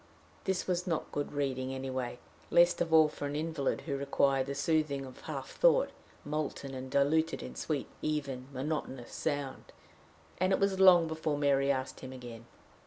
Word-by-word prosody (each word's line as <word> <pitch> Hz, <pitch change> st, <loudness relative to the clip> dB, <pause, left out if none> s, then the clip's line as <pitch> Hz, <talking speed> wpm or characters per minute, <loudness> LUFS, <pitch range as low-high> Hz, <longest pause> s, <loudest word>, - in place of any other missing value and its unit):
This 190 Hz, -1 st, 0 dB
was 180 Hz, -1 st, -1 dB
not 165 Hz, -3 st, -2 dB
good 145 Hz, -, -3 dB
reading 135 Hz, -2 st, -2 dB
anyway, 130 Hz, -2 st, -3 dB, 0.3 s
least 175 Hz, +1 st, +5 dB
of 170 Hz, -1 st, 0 dB
all 160 Hz, -1 st, +7 dB
for 150 Hz, -1 st, -5 dB
an 145 Hz, -, -4 dB
invalid 155 Hz, -2 st, -1 dB
who 140 Hz, -4 st, -3 dB
required 135 Hz, -1 st, +1 dB
the 140 Hz, -, -3 dB
soothing 145 Hz, -2 st, 0 dB
of 130 Hz, -, -12 dB
half 135 Hz, -4 st, -6 dB
thought, -, -, +4 dB, 0.3 s
molten 145 Hz, -2 st, -3 dB
and 130 Hz, 0 st, -6 dB
diluted 160 Hz, -, +2 dB
in 65 Hz, 0 st, -7 dB
sweet, -, -, -2 dB, 0.2 s
even, 140 Hz, -4 st, -2 dB
monotonous 135 Hz, -2 st, -4 dB
sound, 145 Hz, -4 st, -3 dB, 0.7 s
and 185 Hz, +1 st, +2 dB
it 190 Hz, -, +3 dB
was 195 Hz, -1 st, +1 dB
long 180 Hz, -3 st, +8 dB
before 160 Hz, -2 st, -2 dB
Mary 140 Hz, -1 st, +3 dB
asked 130 Hz, -1 st, -3 dB
him 130 Hz, -, -8 dB
again. 120 Hz, -2 st, -9 dB
145 Hz, 170 wpm, -32 LUFS, 130-160 Hz, 0.7 s, long